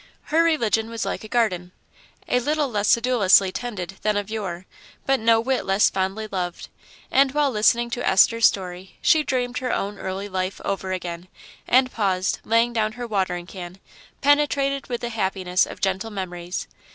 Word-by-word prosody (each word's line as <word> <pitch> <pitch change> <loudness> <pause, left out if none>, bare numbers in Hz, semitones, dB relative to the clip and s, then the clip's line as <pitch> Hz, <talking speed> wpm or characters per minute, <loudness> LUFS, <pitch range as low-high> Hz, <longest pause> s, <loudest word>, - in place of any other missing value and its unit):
Her 325 - +5
religion 230 -9 +1
was 230 -1 -4
like - - -3
a - - -8
garden 185 -7 0 0.5
a 250 - +2
little 295 +3 0
less 210 -4 -1
sedulously 215 -6 +4
tended 195 -5 -5
than 215 -1 +1
of 205 +1 -3
yore, 190 -5 -4 0.4
but 270 0 +2
no 225 0 +4
whit 255 +3 0
less 195 +2 +3
fondly 195 +3 -2
loved; 180 -2 -4 0.4
and 270 0 +4
while 295 -2 +2
listening 235 +2 +2
to 245 - -3
Esther's 230 +4 +5
story 185 -1 -5
she 315 - +4
dreamed 250 -4 -2
her 250 -1 -2
own 200 +1 -2
early 190 +2 -4
life 185 -1 -3
over 190 -1 -2
again, 175 -1 -5 0.4
and 255 +1 +4
paused, 190 -3 0
laying 230 +2 +2
down 215 -2 0
her 245 +1 -6
watering 190 -5 -1
can, 180 -1 -9 0.4
penetrated 280 -1 +2
with 240 -2 -4
the 240 - -3
happiness 190 -4 0
of - - -9
gentle 195 +3 -1
memories. 180 -3 -5
215 Hz, 170 wpm, -23 LUFS, 190-245 Hz, 0.5 s, Her